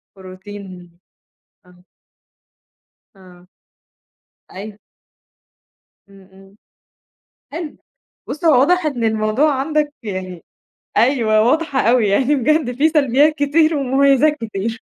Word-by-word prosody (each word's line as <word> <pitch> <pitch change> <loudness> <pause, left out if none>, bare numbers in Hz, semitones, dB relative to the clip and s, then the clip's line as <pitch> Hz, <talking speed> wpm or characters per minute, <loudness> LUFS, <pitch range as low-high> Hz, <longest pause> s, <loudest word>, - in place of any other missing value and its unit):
بروتين، 185 -1 -12 0.8
آه. 180 0 -22 1.3
آه. 180 -1 -18 1.0
أيوه. 205 +2 -9 1.3
إمم، 195 -1 -19
إمم. 195 +1 -19 1.0
حلو، 320 -1 -7 0.5
بُصّ 305 +3 -6
هو 285 -6 +5
واضح 355 +4 +2
إن 255 -6 -2
الموضوع 220 +6 +1
عندك 300 +1 -1
يعني 185 -4 -6 0.5
أيوَه 225 -3 +2
واضحة 280 +3 0
أوي 230 -1 +2
يعني 260 +9 +1
بجد 270 -1 0
في 310 +3 +3
سلبيات 295 0 +2
كتير 310 +2 +1
ومميزات 275 +2 +2
كتير، 225 0 -5
240 Hz, 95 wpm, -18 LUFS, 195-295 Hz, 1.3 s, هو